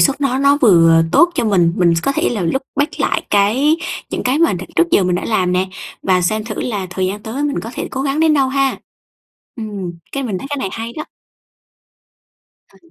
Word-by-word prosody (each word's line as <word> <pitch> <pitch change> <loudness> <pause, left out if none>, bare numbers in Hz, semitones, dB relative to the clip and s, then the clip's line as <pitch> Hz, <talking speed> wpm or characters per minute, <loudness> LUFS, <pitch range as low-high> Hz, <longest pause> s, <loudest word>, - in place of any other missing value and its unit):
xuất 275 0 +2
nó 265 -2 0
nó 280 +1 +4
vừa 165 - +5
tốt 345 0 +5
cho - - 0
mình, 175 -6 +3
mình 175 -2 +3
có 275 - +1
thể - - 0
là 215 -5 -2
look 220 +11 -1
back 290 +2 +1
lại - - 0
cái 240 +10 +3 0.3
những - - -3
cái 255 +4 +1
mà 335 -6 +3
đ 180 - -4 0.2
trước 345 - +3
giờ 200 - +3
mình 180 0 +1
đã 180 - -2
làm 185 -5 0
nè 185 +1 +1 0.4
và 185 -1 +2
xem 215 +4 0
thử 220 -2 -5
là 205 -6 -3
thời 185 0 -1
gian 205 +2 -4
tới 240 +6 -4
mình 285 - -1
có 225 - -7
thể - - -4
cố 265 - -3
gắng 280 +2 -1
đến 315 -1 +4
đâu, 270 -2 +2
ha? 275 0 0 0.8
Ừm, 205 -5 -5 0.2
cái 275 - -2
này - - -3
mình 185 - -2
thấy 275 - -8
cái 290 - -2
này 195 - -2
hay 230 +1 -5
đó! 305 - -4 1.7
À. - - -20
225 Hz, 235 wpm, -17 LUFS, 185-275 Hz, 1.7 s, vừa